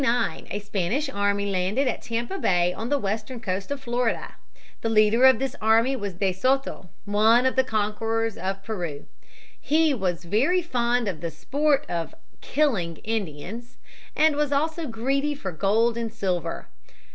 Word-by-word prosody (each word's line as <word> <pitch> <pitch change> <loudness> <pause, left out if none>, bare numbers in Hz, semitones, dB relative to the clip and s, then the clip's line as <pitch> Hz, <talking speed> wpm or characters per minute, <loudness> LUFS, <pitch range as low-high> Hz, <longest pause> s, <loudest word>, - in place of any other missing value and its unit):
In - - +2
1539 230 -3 -1
a 205 - -15
Spanish 210 - -1
army 200 -3 0
landed 195 +9 +1
at 250 - -1
Tampa 235 +11 -3
Bay, 175 -1 +2
on 225 +5 -5
the 290 - +2
western 215 +2 -3
coast 195 -3 -3
of 285 -1 -3
Florida. 240 -2 -1 0.5
The 225 - -1
leader 220 +3 +5
of 260 -2 +7
this 265 +1 -3
army 225 +5 +4
was 205 -6 -4
De 190 +1 0
Soto, 255 -2 0 0.2
one 220 +4 +4
of 260 - +2
the 260 - +4
conquerors 225 0 -1
of 195 +2 -4
Peru. 175 -10 -4 0.6
He 310 0 +3
"was 180 -7 -2
very 270 - +2
fond 245 -5 0
of 180 -6 -3
the 170 - -2
sport 285 - 0
of 170 -2 -4 0.3
killing 215 - 0
Indians" 220 +3 -4 0.4
and 310 -1 +4
was 295 -1 0
also 320 +3 0
greedy 275 +5 -1
for 195 -9 -5
gold 225 +7 +1
and 230 -1 -3
silver. 180 -6 -2
225 Hz, 165 wpm, -25 LUFS, 195-265 Hz, 0.6 s, of